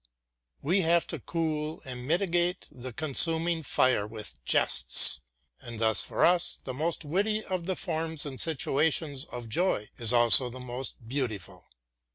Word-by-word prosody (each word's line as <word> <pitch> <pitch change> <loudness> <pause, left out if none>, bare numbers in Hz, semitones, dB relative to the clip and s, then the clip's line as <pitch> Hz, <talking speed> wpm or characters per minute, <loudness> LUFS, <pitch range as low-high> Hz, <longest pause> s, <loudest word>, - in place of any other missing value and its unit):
We 180 +7 +1
have 170 0 +2
to 160 - -5
cool 155 +1 -4
and 125 -1 -8
mitigate 175 +1 -1
the 130 0 -9
consuming 160 +5 +2
fire 130 -7 +1
with 105 - -9
jests, 65 +1 +5 0.4
and 120 -3 -9
thus 110 -2 +3
for - - 0
us 175 0 +1
the 130 - -6
most 160 +4 -3
witty 210 +7 -1
of 185 -2 -4
the 190 - -2
forms 160 -3 -2
and 135 -3 -7
situations 150 -1 -1
of 120 -6 -9
joy 110 - -2
is 115 -1 +3
also 120 +1 +5
the 130 +2 -10
most 125 -1 -6
beautiful. 115 - -5
145 Hz, 150 wpm, -27 LUFS, 125-170 Hz, 0.4 s, jests